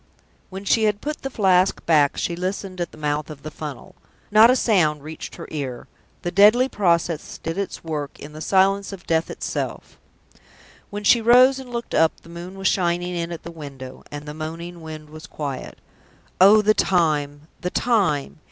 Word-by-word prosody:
When 195 +1 -8
she 220 +2 +3
had 210 -1 +1
put 300 +4 -5
the 270 - -4
Flask 190 -5 +2
back, 150 -4 +3
she 170 - -1
listened 185 +1 -4
at 175 - -3
the - - -15
mouth 150 0 -2
of 150 -2 -10
the 155 - -6
funnel. 150 -5 -8 0.4
Not 215 +2 +8
a 255 - +5
sound 160 - +2
reached 155 +1 -8
her - - -9
ear: 135 -5 -5 0.4
the 175 - -2
deadly 210 +7 +6
process 170 - 0
did 165 0 -4
its 200 0 -4
work 150 -3 -4
in 150 +1 -10
the 155 - -9
silence 195 +3 +2
of 190 -3 -10
death 160 0 0
itself. - - -5 0.9
When 205 +1 -6
she 235 +3 +5
rose 255 +4 +6
and 260 -2 -10
looked 235 -1 -5
up 160 -1 +3
the - - -16
moon 175 +3 -9
was 195 0 0
shining 175 -1 0
in 170 -1 -3
at 170 - -7
the 170 - -8
window, 140 -5 -10
and 145 +1 -7
the 150 - -7
moaning 165 +3 -7
wind 155 -1 -9
was 155 0 -10
quiet. 140 -4 -6 0.6
Oh, 205 +3 +7
the 215 +1 +4
time! 150 -7 +1 0.2
the 180 - -3
time! 185 - 0
175 Hz, 190 wpm, -22 LUFS, 155-200 Hz, 0.9 s, Not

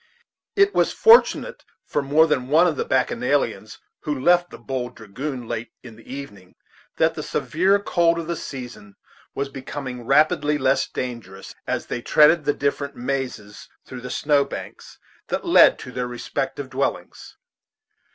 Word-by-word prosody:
It 400 0 +4
was - - +2
fortunate 475 +2 +4 0.2
for 145 - -1
more 145 +3 +4
than 130 -5 -1
one 160 +5 +5
of - - +1
the 460 - -2
bacchanalians 470 - -1 0.2
who 150 -3 -3
left 175 +4 +3
the - - -11
"Bold 125 -2 -5
Dragoon" 125 +4 -6
late 115 0 -5
in 120 -3 -11
the 115 - -15
evening 105 -10 -9 0.4
that - - +3
the - - -5
severe 190 +5 +1
cold 170 -4 +1
of 165 - -4
the 170 +1 -3
season 125 -9 -9 0.4
was 140 0 -2
becoming 130 -3 -7
rapidly 150 +1 +3
less 135 -1 +1
dangerous 115 -7 -7
as - - -2
they 120 - -4
threaded 150 +5 +4
the 145 - +2
different 140 0 -2
mazes 125 -5 -5 0.2
through 130 -1 -9
the 125 - -7
snow 145 -1 +2
banks - - -9 0.3
that - - -3
led - - +6
to - - -9
their 125 0 -3
respective 120 0 -4
dwellings. - - -4
140 Hz, 155 wpm, -22 LUFS, 125-155 Hz, 0.4 s, led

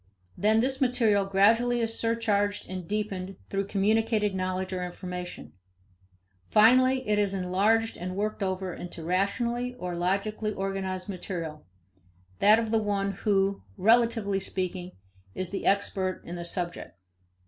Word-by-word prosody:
Then 220 +2 +3
this 265 +2 0
material 225 -6 +3
gradually 225 +5 +3
is 225 -1 -1
surcharged 210 -3 0
and 185 -2 -6
deepened 195 -2 -3 0.2
through 195 0 -1
communicated 215 +1 +1
knowledge 185 0 -2
or 180 -1 -2
information. 180 - -7 1.0
Finally, 255 +4 +5
it 210 0 +2
is 200 -1 +1
enlarged 200 +5 +1
and 185 +1 -5
worked 210 +2 -2
over 190 -1 -2
into 175 -1 -8
rationally 235 +8 -1
or 180 -7 -5
logically 200 +5 -1
organized 190 -1 -3
material 170 -5 -6 0.7
that 210 +2 +6
of 225 -1 -1
the 225 -1 +3
one 200 -1 0
who, 195 0 +1 0.2
relatively 225 -2 +3
speaking, 185 -1 -4 0.4
is 185 0 -4
expert 195 -2 0
in 175 - -6
the 170 -1 -5
subject. 175 - -4
200 Hz, 130 wpm, -28 LUFS, 185-220 Hz, 1.0 s, that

